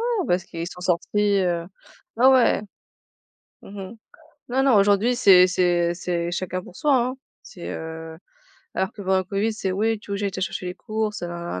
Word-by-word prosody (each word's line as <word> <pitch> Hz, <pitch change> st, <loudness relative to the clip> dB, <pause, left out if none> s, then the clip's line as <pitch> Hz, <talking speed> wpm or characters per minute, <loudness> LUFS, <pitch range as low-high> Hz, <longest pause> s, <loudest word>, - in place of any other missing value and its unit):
Oh 465 Hz, -5 st, 0 dB
bah -, -, +3 dB
parce 180 Hz, -, -3 dB
qu'ils 170 Hz, 0 st, -6 dB
sont 180 Hz, -, -11 dB
sortis, 200 Hz, +3 st, +1 dB
heu 175 Hz, -2 st, 0 dB, 0.5 s
ouais, 245 Hz, +3 st, +4 dB
ouais. 260 Hz, -5 st, +5 dB, 1.0 s
Mmh -, -, -13 dB, 0.2 s
mh. -, -, -17 dB, 0.5 s
Non 260 Hz, +2 st, +1 dB
non, 270 Hz, -, +5 dB
aujourd'hui 205 Hz, +4 st, +3 dB
c'est 185 Hz, -5 st, +7 dB
c'est 175 Hz, -1 st, +1 dB
c'est 175 Hz, -1 st, -2 dB
chacun 185 Hz, +1 st, -3 dB
pour 180 Hz, -, -14 dB
soi, 295 Hz, -2 st, +2 dB
hein. 250 Hz, +1 st, 0 dB, 0.3 s
C'est, 175 Hz, -, -10 dB
heu 160 Hz, 0 st, -7 dB, 0.6 s
alors 190 Hz, +3 st, -1 dB
que 205 Hz, -, -9 dB
pendant 190 Hz, 0 st, +2 dB
le 185 Hz, -, -2 dB
Covid 200 Hz, +4 st, -1 dB
c'est: 200 Hz, -3 st, -3 dB
«Oui, 220 Hz, +3 st, 0 dB
tu 210 Hz, -, -14 dB
veux -, -, -1 dB
que -, -, -5 dB
j'aille 200 Hz, -, -1 dB
te 190 Hz, -, -5 dB
chercher 185 Hz, 0 st, -3 dB
les 180 Hz, -, -4 dB
courses? 215 Hz, 0 st, -3 dB
Heu, 175 Hz, -, -3 dB
na 170 Hz, -, -5 dB
190 Hz, 205 wpm, -23 LUFS, 175-220 Hz, 1.0 s, c'est